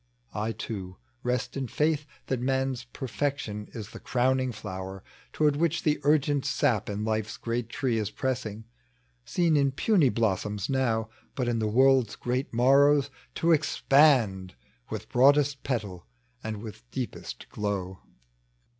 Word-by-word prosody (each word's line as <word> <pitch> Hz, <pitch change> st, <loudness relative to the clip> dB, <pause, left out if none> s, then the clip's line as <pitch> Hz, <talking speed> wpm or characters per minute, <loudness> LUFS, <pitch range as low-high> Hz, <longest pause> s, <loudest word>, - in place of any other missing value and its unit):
I 110 Hz, +2 st, -1 dB
too 95 Hz, -5 st, -6 dB, 0.2 s
rest 125 Hz, 0 st, -2 dB
in 135 Hz, -2 st, -2 dB
faith 150 Hz, +2 st, 0 dB, 0.2 s
That 130 Hz, -, -1 dB
man's 130 Hz, 0 st, -1 dB
perfection 130 Hz, -4 st, -3 dB
is 105 Hz, -3 st, -7 dB
the -, -, -9 dB
crowning 130 Hz, +1 st, +1 dB
flower, 95 Hz, -3 st, -7 dB, 0.3 s
Toward 150 Hz, -2 st, +2 dB
which 170 Hz, +1 st, +1 dB
the 150 Hz, -1 st, +2 dB
ui^ent 145 Hz, -1 st, +3 dB
sap 140 Hz, -7 st, +1 dB
in 105 Hz, +1 st, -3 dB
life's 110 Hz, -1 st, -2 dB
great 115 Hz, 0 st, -3 dB
tree 120 Hz, -3 st, 0 dB
Is 105 Hz, -1 st, -2 dB
pressing, 115 Hz, -3 st, -3 dB, 0.3 s
— -, -, -41 dB
seen 170 Hz, -3 st, +2 dB
in 140 Hz, -2 st, +3 dB
puny 160 Hz, -, +3 dB
blossoms 105 Hz, -1 st, -1 dB
now, 115 Hz, -5 st, +1 dB, 0.3 s
But 125 Hz, -3 st, -1 dB
in 120 Hz, -1 st, 0 dB
the 110 Hz, -, 0 dB
world's 130 Hz, 0 st, +4 dB
great 125 Hz, +2 st, -2 dB
moiTows 140 Hz, +3 st, +4 dB, 0.2 s
to 170 Hz, -, +2 dB
expand 135 Hz, -, +3 dB, 0.3 s
With -, -, -5 dB
broadest 140 Hz, +1 st, +4 dB
petal 105 Hz, -9 st, -3 dB, 0.4 s
and 110 Hz, -1 st, -5 dB
with 100 Hz, -, -10 dB
deepest -, -, -6 dB
glow. 95 Hz, -3 st, -3 dB
125 Hz, 140 wpm, -28 LUFS, 105-140 Hz, 0.4 s, world's